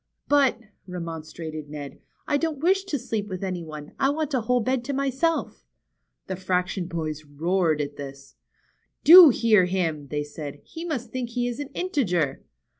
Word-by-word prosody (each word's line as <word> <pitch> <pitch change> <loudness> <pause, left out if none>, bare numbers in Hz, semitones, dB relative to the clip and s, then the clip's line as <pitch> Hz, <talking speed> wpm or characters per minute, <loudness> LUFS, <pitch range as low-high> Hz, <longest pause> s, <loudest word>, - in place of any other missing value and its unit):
But," 280 -5 +3 0.3
remonstrated 160 -3 -6
Ned, 145 -2 -8 0.3
I 290 - +2
don't 320 0 -1
wish 380 +6 +2
to 310 -6 -2
sleep 225 -5 -3
with 185 -1 -5
any 185 -2 -3
one. 150 -2 -9
I 270 - +3
want 305 0 -2
a 255 - +2
whole 250 +3 +2
bed 255 +2 0
to 280 - -2
myself." 275 +4 -1 0.6
The 190 - -4
fraction 180 0 -1
boys 155 -3 -4
roared 160 +2 0
at 145 0 -5
this. 140 -1 -9 0.7
Do 345 0 +11
hear 225 -6 +4
him," 165 -6 -1
they 150 +1 -2
said. 145 -1 -8
He 330 +1 -8
must 250 -9 -4
think 255 -2 -3
he 245 +1 -1
is 245 +1 -4
an 290 - -4
integer 180 - 0
190 Hz, 170 wpm, -25 LUFS, -, 0.7 s, Do